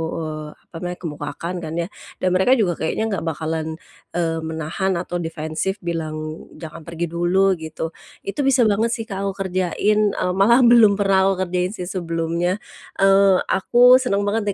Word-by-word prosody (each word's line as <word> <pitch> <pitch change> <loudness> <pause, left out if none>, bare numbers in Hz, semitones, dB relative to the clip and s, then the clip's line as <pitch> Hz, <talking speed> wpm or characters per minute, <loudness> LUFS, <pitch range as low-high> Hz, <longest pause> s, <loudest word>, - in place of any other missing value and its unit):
eee, 155 -1 -5
apa - - -22
namanya, 180 +1 -4
kemukakan 165 +2 -5
kan 160 -2 -6
ya. 170 0 -1 0.4
Dan 185 - +3
mereka 190 +8 +4
juga 205 -8 +1
kayaknya 160 +7 -1
enggak 195 -5 -2
bakalan, 160 0 -3 0.4
eee, 165 -2 0
menahan 160 +4 -2
atau 175 0 -3
defensif 160 +3 -3
bilang, 155 -2 -4
"jangan 160 0 -10
pergi 170 0 -4
dulu," 180 +3 +2
gitu. 160 +1 -5 0.3
Itu 200 - -6
bisa 265 -2 +4
banget 220 +2 +2
sih 225 - -5
Kak 200 -2 -4
aku 195 0 -3
kerjain, 185 +3 0 0.2
eee, 180 - 0
malah 230 +7 +5
belum 235 -4 +6
pernah 195 -1 +3
aku 190 -1 0
kerjain 180 +2 -2
sih 185 - -5
sebelumnya. 175 +1 -2 0.3
Eee, 195 -1 +4
aku 245 +6 +6
seneng 205 -6 0
banget 205 +1 -1
180 Hz, 165 wpm, -21 LUFS, 165-200 Hz, 0.4 s, belum